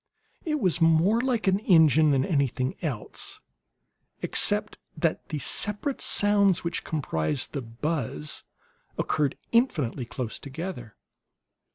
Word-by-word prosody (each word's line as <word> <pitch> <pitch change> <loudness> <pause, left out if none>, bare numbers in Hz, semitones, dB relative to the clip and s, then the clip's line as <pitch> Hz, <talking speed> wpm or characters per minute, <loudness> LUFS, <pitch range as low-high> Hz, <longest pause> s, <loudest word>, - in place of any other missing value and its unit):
It 305 -2 0
was 180 - +1
more 165 +8 +4
like 250 -3 0
an 190 +1 +3
engine 160 - +5
than 135 -2 +2
anything 135 -4 0
else, 135 -10 -3 0.8
except - - +2 0.2
that - - -1
the 155 - -3
separate 210 - -2
sounds 200 -3 +3
which 170 +1 -2
comprised 130 - -2
the 140 - -2
buzz 115 - -4 0.5
occurred 145 -3 0
infinitely 150 - +1
close 120 -1 -5
together. 140 - -7
160 Hz, 110 wpm, -26 LUFS, 130-195 Hz, 0.8 s, engine